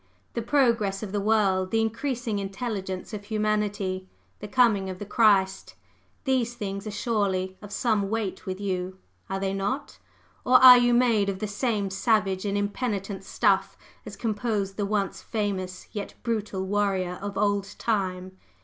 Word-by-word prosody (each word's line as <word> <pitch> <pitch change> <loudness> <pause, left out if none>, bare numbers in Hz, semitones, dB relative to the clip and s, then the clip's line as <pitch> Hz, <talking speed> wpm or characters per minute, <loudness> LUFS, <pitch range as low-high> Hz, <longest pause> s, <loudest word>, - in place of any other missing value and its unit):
The 235 - -2
progress 230 -6 +1
of 200 - -5
the 205 0 -1
world, 195 -3 +2
the 225 - +1
increasing 230 -1 -1
intelligence 195 -1 -4
of 205 -1 -6
humanity, 205 -3 -1 0.3
the 210 - -7
coming 205 -4 +3
of 185 - -5
the 205 - -6
Christ, 200 -3 +2 0.5
these 250 -3 0
things 200 -1 -5
are - - -2
surely 200 -3 -1
of 205 -1 -10
some 205 -2 +1
weight 215 -2 -3
with 185 0 -3
you, 185 -2 -3 0.3
are 195 0 -2
they 195 0 -1
not? 200 +9 -3 0.4
Or 255 - +3
are 255 -1 +10
you 245 0 +3
made 230 -5 +3
of 195 - -2
the 215 - -3
same 205 -2 -1
savage 195 -1 +1
and 200 0 0
impenitent 205 -2 -2
stuff 190 - +1 0.3
as - - -8
composed 210 -3 -2
the 205 -1 -1
once 200 -2 -1
famous 195 -4 -3
yet 205 -2 -6
brutal 210 -4 -2
warrior 190 -3 0
of 200 -1 -5
old 205 -1 0
time? 185 -4 -2
205 Hz, 160 wpm, -26 LUFS, 195-225 Hz, 0.5 s, are